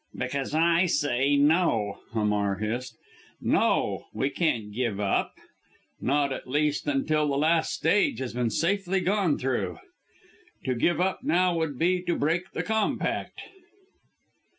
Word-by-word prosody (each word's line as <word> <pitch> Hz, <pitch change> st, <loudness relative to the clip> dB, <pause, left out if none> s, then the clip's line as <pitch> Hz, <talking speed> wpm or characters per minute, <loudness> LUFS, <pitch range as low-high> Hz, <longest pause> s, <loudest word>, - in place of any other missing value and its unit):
"Because 140 Hz, +1 st, -3 dB
I 170 Hz, +3 st, +3 dB
say 145 Hz, -2 st, +1 dB
no!" 140 Hz, -, +2 dB
Hamar 105 Hz, -2 st, +1 dB
hissed. 115 Hz, +4 st, -4 dB, 0.4 s
"No! -, -, +1 dB
We 135 Hz, +2 st, 0 dB
can't 115 Hz, -12 st, -1 dB
give 115 Hz, -3 st, -2 dB
up 100 Hz, -2 st, 0 dB, 0.7 s
not, 140 Hz, 0 st, +1 dB
at -, -, -7 dB
least, 150 Hz, +2 st, 0 dB
until 150 Hz, +2 st, +1 dB
the 140 Hz, -1 st, 0 dB
last 160 Hz, +2 st, +2 dB
stage 205 Hz, -, +2 dB
has 130 Hz, -3 st, -4 dB
been 120 Hz, -1 st, 0 dB
safely 195 Hz, -, 0 dB
gone 185 Hz, -4 st, +1 dB
through. 130 Hz, -1 st, -2 dB, 0.9 s
To 130 Hz, -, +1 dB
give 155 Hz, +7 st, +1 dB
up 185 Hz, +1 st, 0 dB
now 180 Hz, 0 st, +2 dB
would 160 Hz, -5 st, -2 dB
be 180 Hz, +4 st, +2 dB
to 175 Hz, -1 st, -1 dB
break 170 Hz, +5 st, 0 dB
the -, -, -2 dB
compact!" 220 Hz, -1 st, -1 dB
145 Hz, 135 wpm, -27 LUFS, 125-175 Hz, 0.9 s, I